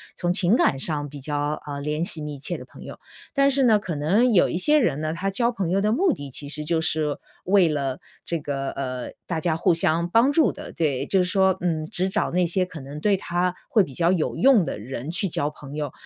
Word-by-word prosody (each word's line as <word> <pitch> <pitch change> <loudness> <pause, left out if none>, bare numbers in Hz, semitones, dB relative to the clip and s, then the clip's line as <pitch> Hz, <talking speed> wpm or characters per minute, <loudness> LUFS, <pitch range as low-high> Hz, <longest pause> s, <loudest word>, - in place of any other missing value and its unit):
从 175 0 0
情 185 +5 +2
感 135 - +2
上 145 0 -1
比 145 -1 -10
较， 145 +1 -2
呃， 140 -1 -4
联 150 +3 -2
系 175 -3 -1
密 145 -2 -6
切 - - -3
的 - - -10
朋 - - -15
友。 - - -10 0.4
但 275 0 +4
是 275 0 +3
呢 225 -4 +5
可 185 -5 -5
能 205 +12 +2
有 175 - +4
一 - - -2
些 300 +11 +4
人 155 - +1
呢， 155 0 -2
他 185 +4 -2
交 235 +5 +1
朋 195 -8 -3
友 190 +3 +2
的 210 +2 +1
目 350 - +3
的 140 - -6
其 145 +2 -6
实 150 0 -3
就 165 0 0
是 155 -2 0 0.3
为 185 -2 +4
了 140 -3 -2 0.3
这 170 -2 -1
个， 135 -2 -3
呃， 130 -2 -5 0.2
大 165 -3 -2
家 160 -1 0
互 165 - +2
相 170 0 +2
帮 235 +8 +4
助 310 0 +3
的， - - -9
对。 140 -4 -1
就 190 - +1
是 180 - 0
说， 190 -1 +3
嗯， 160 -3 -1
只 185 +4 -1
找 215 +2 -1
那 180 0 +2
些 185 +2 +1
可 170 -3 -10
能 140 +2 -8
对 200 +3 +2
他 175 0 -1 0.2
会 220 -8 +4
比 140 - -8
较 170 +3 +2
有 170 -4 0
用 255 -6 +5
的 - - -4
人 130 +5 -6
去 190 +3 -1
交 150 -3 -1
朋 145 -1 -11
友。 150 -3 -3
170 Hz, 265 characters per minute, -24 LUFS, 145-195 Hz, 0.4 s, 呢